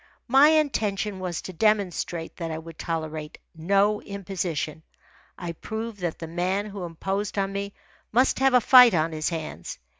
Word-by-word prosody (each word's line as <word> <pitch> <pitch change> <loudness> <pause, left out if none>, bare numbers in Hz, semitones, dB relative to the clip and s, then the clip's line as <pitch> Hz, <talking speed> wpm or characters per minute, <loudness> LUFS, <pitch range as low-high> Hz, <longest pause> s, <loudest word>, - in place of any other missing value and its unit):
My 270 +4 +7
intention 215 -10 0
was 180 -2 -4
to 185 - -7
demonstrate 180 -4 0
that 165 -2 -4
I 160 - -3
would 160 0 -10
tolerate 155 -2 -4 0.2
no 200 +5 +2
imposition. 180 -6 -4 0.6
I 175 - -5
proved 220 +5 -6
that 175 -3 -3
the 165 - -6
man 180 +5 -1
who 200 -3 -6
imposed 195 +5 -3
on 195 0 0
me 200 0 -4 0.4
must 255 +4 +3
have 265 -1 +4
a 250 - +6
fight 250 -3 +8
on 160 0 +1
his 155 -1 -1
hands. 155 - -6
190 Hz, 160 wpm, -25 LUFS, 165-210 Hz, 0.6 s, fight